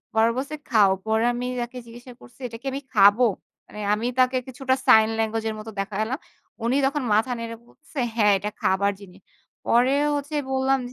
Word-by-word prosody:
পরে 220 +1 +4
বলছে 280 +4 -3 0.2
খাও। 210 -5 +5 0.2
পরে 220 +1 +1
আমি 245 +1 -3
তাকে 240 +1 -5
জিজ্ঞাসা 240 +2 -12
করছি 245 - -17
এটা 230 -1 -8
কি - - -11
আমি 275 - -3
খাবো? 205 +4 +6 0.4
মানে 210 - -11 0.2
আমি 220 +3 -3
তাকে 255 0 +3
কিছুটা 260 0 -1
সাইন 220 0 +7
ল্যাঙ্গুয়েজ 225 0 -1
এর 220 - -3
মত 215 +1 -9
দেখালাম। 215 +7 -2 0.5
উনি 240 +3 +1
তখন 280 +1 -1
মাথা 225 +4 +2
নেড়ে 230 0 -6
বলছে, 295 +3 -13 0.2
হ্যাঁ, 210 -2 +4
এটা 210 +2 -4
খাবার 200 +2 +2
জিনিস। 195 -1 -14 0.5
পরে 245 +3 +3 0.2
হচ্ছে 290 +2 -5 0.2
বললাম 265 0 +2
230 Hz, 180 wpm, -24 LUFS, 215-260 Hz, 0.5 s, সাইন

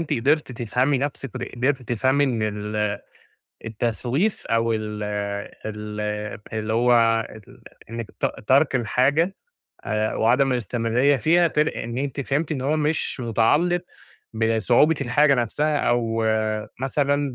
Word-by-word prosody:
أنتِ 165 - -3
قدرتِ 140 +2 +1
تفهمي 125 +4 0
نَفْسِك، 135 -2 -4
ود 125 - -5
قدرتِ 130 +2 -1
تفهمي 130 +4 +1
إن 120 -5 -1
ال 105 0 -2 0.7
التسويف 120 - -1
أو 115 0 +1
ال 105 -1 -4 0.6
ال 105 0 -5 0.5
اللي 110 0 -2
هو 120 +1 +3 0.4
ال 110 -2 -15 0.3
إنِّك 115 -1 -5
ت - - +1 0.2
تَرْك 135 +1 +4
الحاجة 135 - +1 0.5
آآ 110 0 -1
وعدم 130 +4 +3
الاستمرارية 120 +4 +1
فيها 170 +5 +3
تل 150 +1 +1
إن 120 +2 -5
أنتِ 140 0 -3
فهمتِ 145 +4 -1
إن 135 - -3
هو 145 +4 0
مش 150 -3 -1
متعلّق 145 +10 +2 0.5
بصعوبة 115 +7 +3
الحاجة 140 +3 +3
نَفْسها 145 +5 0
أو 115 -3 0 0.6
مثلًا 140 0 0
125 Hz, 130 wpm, -23 LUFS, 115-145 Hz, 0.7 s, تَرْك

